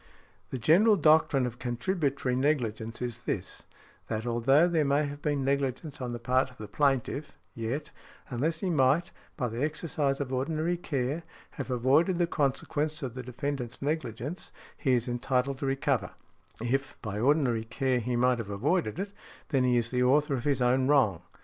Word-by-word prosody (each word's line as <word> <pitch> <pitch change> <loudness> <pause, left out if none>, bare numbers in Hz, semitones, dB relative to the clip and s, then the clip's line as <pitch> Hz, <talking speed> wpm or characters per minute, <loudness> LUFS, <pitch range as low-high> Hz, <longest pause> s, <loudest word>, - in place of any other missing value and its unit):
The 130 - -3
general 185 - +5
doctrine 155 -5 +4
of 120 0 -5
contributory 135 0 -1
negligence 120 -5 -1
is 120 -2 -3
this, - - -3 0.4
that 110 +1 -3
although 130 +7 +4
there 165 -3 +2
may 145 +1 +2
have 145 0 -6
been 145 -3 0
negligence 140 +1 -1
on 125 -1 -3
the 120 - -3
part 130 +2 +1
of 130 - -18
the 105 - -7
plaintiff, 140 +4 0 0.2
yet, 120 +6 -4 0.4
unless 145 +7 -1
he 190 -3 0
might, 145 +3 +3 0.3
by 125 -5 0
the 115 +2 -4
exercise 150 -2 0
of 135 -2 -3
ordinary 155 +6 0
care, 145 -2 -2 0.3
have 140 -2 -6
avoided 135 +9 +3
the 175 - +3
consequence 150 0 -1
of 125 -3 -4
the 130 - -5
defendant's 125 0 -4
negligence, 145 - -3 0.2
he 130 - +1
is 120 -1 +1
entitled 125 +2 0
to 140 - -2
recover; 135 - 0 0.5
if, 135 +4 -2
by 105 -2 -3
ordinary 125 -3 +2
care, 130 +2 0
he 120 +1 -2
might 125 0 +3
have 110 -3 -5
avoided 115 - 0
it, 200 +1 -4 0.4
then 135 -4 +2
he 125 -1 +3
is 115 -1 +1
the 125 -1 +1
author 140 +3 +3
of 125 -3 -2
his 140 -3 +2
own 130 +1 +3
wrong. 120 - +3
135 Hz, 175 wpm, -29 LUFS, 125-150 Hz, 0.5 s, general